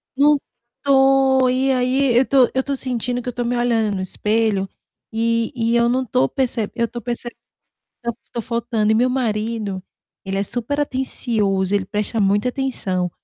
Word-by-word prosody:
Não 290 Hz, +2 st, +5 dB, 0.5 s
tô 270 Hz, -1 st, +4 dB
e 260 Hz, +2 st, +1 dB
aí 255 Hz, 0 st, +2 dB
eu 260 Hz, -, +5 dB
tô 260 Hz, -3 st, +4 dB
eu 265 Hz, -, +1 dB
tô 280 Hz, +1 st, -2 dB
sentindo 245 Hz, -1 st, -2 dB
que 250 Hz, -, -5 dB
eu -, -, -6 dB
tô 245 Hz, -, -2 dB
me 245 Hz, +1 st, -1 dB
olhando 225 Hz, -4 st, +1 dB
no 190 Hz, -, -3 dB
espelho 210 Hz, +1 st, 0 dB, 0.4 s
e 230 Hz, +1 st, 0 dB
e 230 Hz, 0 st, +1 dB
eu 235 Hz, 0 st, +3 dB
não 255 Hz, +1 st, 0 dB
tô 135 Hz, -, +2 dB
perceb 240 Hz, -5 st, -1 dB
eu 235 Hz, -, +1 dB
estou 240 Hz, +1 st, -7 dB
perceb 240 Hz, 0 st, -4 dB, 0.7 s
eu 235 Hz, -, -1 dB, 0.2 s
tô 235 Hz, -, -2 dB
faltando 230 Hz, -2 st, -1 dB
e -, -, +3 dB
meu 245 Hz, +3 st, +3 dB
marido, 220 Hz, -5 st, -2 dB, 0.4 s
ele 195 Hz, 0 st, -2 dB
é -, -, +1 dB
superatencioso, 235 Hz, -6 st, -1 dB
ele 200 Hz, -2 st, +1 dB
presta 210 Hz, +3 st, -2 dB
muita 205 Hz, +3 st, +2 dB
atenção. 200 Hz, -9 st, -2 dB
235 Hz, 170 wpm, -20 LUFS, 215-255 Hz, 0.7 s, Não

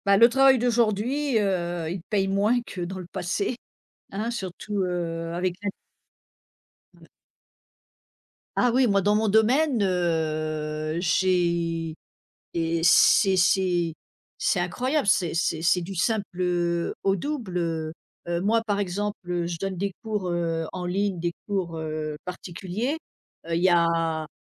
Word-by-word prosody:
Bah, 200 Hz, 0 st, +5 dB
le 230 Hz, +3 st, +8 dB
travail 270 Hz, +1 st, +5 dB
d'aujourd'hui, 240 Hz, +3 st, +1 dB
heu, 175 Hz, -5 st, -1 dB
il 180 Hz, 0 st, -4 dB
paye 195 Hz, +2 st, 0 dB
moins 205 Hz, +5 st, +2 dB
que 190 Hz, -5 st, -7 dB
dans 180 Hz, +2 st, -4 dB
le 185 Hz, -, -7 dB
passé, 200 Hz, +7 st, -2 dB, 0.6 s
hein, 215 Hz, +4 st, -2 dB
surtout, 200 Hz, -2 st, -4 dB
heu, 165 Hz, -2 st, -3 dB
avec 180 Hz, 0 st, -1 dB
l'in 205 Hz, 0 st, -2 dB, 1.3 s
Ouais. -, -, -17 dB, 1.5 s
Ah 245 Hz, -, +4 dB
oui, 260 Hz, +1 st, +4 dB
moi 200 Hz, -3 st, +3 dB
dans 205 Hz, +2 st, +3 dB
mon 215 Hz, 0 st, +2 dB
domaine, 240 Hz, +5 st, +3 dB
heu, 155 Hz, -4 st, -1 dB
j'ai 170 Hz, -2 st, +1 dB, 0.6 s
et 165 Hz, 0 st, 0 dB
c'est 190 Hz, +3 st, +6 dB
c'est 180 Hz, -2 st, +2 dB, 0.4 s
c'est -, -, +1 dB
incroyable, 250 Hz, -, 0 dB
c'est 180 Hz, -4 st, +2 dB
c'est 165 Hz, -1 st, 0 dB
c'est 180 Hz, +1 st, +3 dB
du 190 Hz, +3 st, -6 dB
simple, 210 Hz, +3 st, +1 dB, 0.2 s
heu, 175 Hz, -1 st, 0 dB
au 195 Hz, -, +3 dB
double, 215 Hz, -, -3 dB
heu. 160 Hz, -2 st, -2 dB, 0.3 s
Heu, 170 Hz, 0 st, -1 dB
moi 225 Hz, +4 st, +2 dB
par 205 Hz, -1 st, 0 dB
exemple, 205 Hz, +2 st, -2 dB
heu, 175 Hz, -1 st, 0 dB
je 170 Hz, -1 st, -4 dB
donne 195 Hz, +1 st, -3 dB
des 200 Hz, +2 st, -2 dB
cours, 210 Hz, -5 st, -2 dB
heu, 165 Hz, -2 st, -1 dB
en 180 Hz, -1 st, -5 dB
ligne, 190 Hz, 0 st, -1 dB
des 170 Hz, 0 st, -1 dB
cours, 185 Hz, -5 st, -2 dB
heu, 155 Hz, -1 st, -4 dB
particuliers. 185 Hz, -, -4 dB, 0.5 s
Heu, 165 Hz, -, -2 dB
Il 170 Hz, -, 0 dB
y 185 Hz, -, +5 dB
a 165 Hz, -2 st, +2 dB
180 Hz, 145 wpm, -25 LUFS, 170-205 Hz, 1.5 s, le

